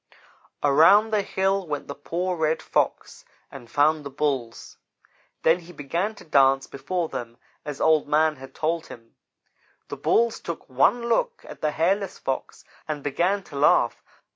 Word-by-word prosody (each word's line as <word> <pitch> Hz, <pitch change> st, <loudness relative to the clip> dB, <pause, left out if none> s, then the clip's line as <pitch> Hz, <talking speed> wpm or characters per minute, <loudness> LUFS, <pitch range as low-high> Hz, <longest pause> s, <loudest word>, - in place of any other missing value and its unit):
"Around 165 Hz, +10 st, +5 dB
the 210 Hz, -, +3 dB
hill 195 Hz, -1 st, -1 dB
went 145 Hz, -2 st, -4 dB
the 140 Hz, -, -5 dB
poor 175 Hz, +6 st, -3 dB
Red 160 Hz, -1 st, 0 dB
Fox -, -, -2 dB, 0.3 s
and 125 Hz, -4 st, -11 dB
found 150 Hz, +3 st, +2 dB
the 140 Hz, -, -6 dB
Bulls. 135 Hz, -5 st, -3 dB, 0.6 s
Then 165 Hz, +2 st, +4 dB
he 175 Hz, 0 st, -13 dB
began 170 Hz, +8 st, -2 dB
to -, -, -13 dB
dance 135 Hz, -3 st, +4 dB
before 175 Hz, +5 st, -3 dB
them 120 Hz, -5 st, -7 dB, 0.3 s
as 145 Hz, -2 st, -6 dB
Old 155 Hz, -2 st, +3 dB
man 155 Hz, 0 st, +2 dB
had 135 Hz, 0 st, -12 dB
told 165 Hz, +1 st, -1 dB
him. 115 Hz, -1 st, -13 dB, 0.7 s
The -, -, -6 dB
Bulls 235 Hz, 0 st, +2 dB
took 170 Hz, -, -7 dB
one 235 Hz, -, +2 dB
look 475 Hz, -, 0 dB
at -, -, -11 dB
the 155 Hz, -, +1 dB
hairless 190 Hz, +5 st, 0 dB
Fox 135 Hz, -, -5 dB, 0.2 s
and 150 Hz, -2 st, -4 dB
began 180 Hz, +8 st, 0 dB
to 145 Hz, -, -13 dB
laugh. 140 Hz, +2 st, +3 dB
155 Hz, 160 wpm, -24 LUFS, 140-185 Hz, 0.7 s, Around